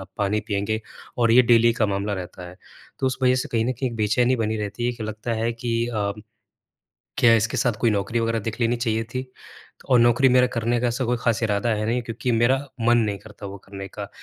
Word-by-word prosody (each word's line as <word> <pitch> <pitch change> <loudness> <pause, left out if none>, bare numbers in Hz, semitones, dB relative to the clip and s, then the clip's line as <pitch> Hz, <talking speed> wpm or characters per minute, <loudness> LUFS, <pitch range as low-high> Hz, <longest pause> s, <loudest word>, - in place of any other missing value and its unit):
अ, - - -7
पानी 105 +1 0
पिएँगे 105 +2 -1 0.4
और 115 -1 +3
ये 125 +1 +7
डेली 115 0 +5
का 115 -1 +1
मामला 100 +1 -2
रहता 90 -1 -8
है। 90 - -13 0.4
तो 135 - 0
उस 130 - -1
वज़ह 130 0 +4
से 130 - -2
कहीं 115 -1 +1
न 130 - +1
कहीं 130 +1 -3
एक 115 - -7
बेचैनी 120 +4 +2
बनी 110 -1 -1
रहती 105 +3 -3
है 125 - 0
कि, 115 - -8
लगता 110 +2 -4
है 115 +1 -1
कि 115 0 -2
अ, 105 -4 -1 1.1
क्या 120 -2 +6
इसके 110 +3 0
साथ 120 +1 +2
कोई 115 - +3
नौकरी 105 +3 -1
वग़ैरह 115 0 0
देख 115 +3 -5
लेनी 115 +1 +2
चाहिए 115 -2 -1
थी? 130 +3 -5 0.6
और 125 - +6
नौकरी 120 +3 +5
मेरा 125 0 +5
करने 120 +1 0
का 125 - +1
ऐसा 125 +2 -2
कोई 125 +1 0
ख़ास 120 -2 0
इरादा 105 +1 0
है 105 0 -2
नहीं 120 +2 0
क्योंकि 120 +1 -3
मेरा 120 +3 +3 0.3
मन 120 0 +5
नहीं 105 -3 0
करता 105 -1 -11
वो 100 0 -8
करने 95 0 -8
का। - - -7
115 Hz, 235 wpm, -23 LUFS, 105-120 Hz, 1.1 s, ये